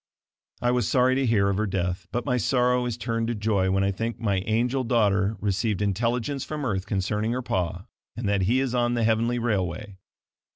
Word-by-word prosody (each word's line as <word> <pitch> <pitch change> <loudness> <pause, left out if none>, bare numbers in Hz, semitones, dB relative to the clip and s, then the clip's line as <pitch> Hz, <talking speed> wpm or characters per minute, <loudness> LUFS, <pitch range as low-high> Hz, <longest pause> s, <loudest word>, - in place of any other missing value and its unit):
I 120 - +3
was 125 -4 +1
sorry 130 0 +3
to 135 0 +1
hear 105 -4 +3
of 100 -1 0
her 110 +1 0
death 90 -1 -2
but 120 - -2
my 125 -3 +1
sorrow 125 +1 +2
is 120 -2 -3
turned 115 -1 -2
to 120 - -1
joy 100 -3 +1
when 95 +1 +2
I 100 - +2
think 115 +4 -4
my 100 -4 0
angel 120 +4 +1
daughter 105 -3 +2
received 100 0 0
intelligence 120 +7 -1
from 150 -2 -4
earth 95 -4 -2
concerning 105 +3 -1
her 125 +1 -3
pa, 90 -3 -2 0.3
and 115 -3 -3
that 100 -1 +1
he 125 +3 +3
is 130 -2 -1
on 120 -1 +1
the 120 - 0
heavenly 115 +2 +2
railway. 100 -3 -2
110 Hz, 205 wpm, -25 LUFS, 100-120 Hz, 0.3 s, I